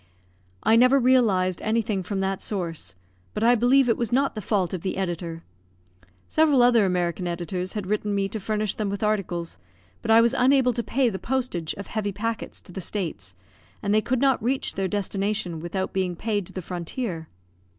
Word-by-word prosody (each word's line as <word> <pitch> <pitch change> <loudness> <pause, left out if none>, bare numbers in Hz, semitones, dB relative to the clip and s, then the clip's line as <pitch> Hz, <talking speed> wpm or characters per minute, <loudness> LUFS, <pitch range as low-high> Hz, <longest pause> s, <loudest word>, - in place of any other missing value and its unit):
I 225 - +5
never 255 +4 +6
realised 215 -9 +3
anything 215 -2 0
from 195 +1 -3
that 195 0 -1
source; 170 - -3 0.4
but - - -1
I 240 +1 +6
believe 245 +3 +4
it 230 - +2
was 235 -3 -1
not 275 +3 +2
the 215 - -5
fault 190 -2 0
of 185 - -3
the 185 - -3
editor. 170 -3 -3 0.8
Several 300 -5 +4
other 235 -4 +5
American 180 0 -1
editors 180 +2 -3
had 210 -3 -3
written 210 +1 -1
to 205 - 0
me 195 -1 +1
to 220 - -4
furnish 215 0 -1
them 210 -2 -2
with 200 +1 -3
articles; 175 - -1 0.4
but - - -6
I 225 +1 +7
was 235 +1 +4
unable 260 -1 +4
to 235 - -1
pay 255 +2 +1
the 190 -3 -5
postage 240 -11 -2
of 200 - -7
heavy 210 -2 -2
packets 225 +3 -4
to - - -11
the 190 - -6
States, 155 - -4 0.5
and 200 - +1
they 215 - +4
could 255 +2 -1
not 270 -2 +3
reach 260 +4 -1
their 195 -1 -1
destination 200 -2 -2
without 175 +3 -3
being 185 -2 -1
paid 205 -1 -2
to - - -11
the 185 - -5
frontier. 175 0 -4
205 Hz, 195 wpm, -25 LUFS, 185-235 Hz, 0.8 s, I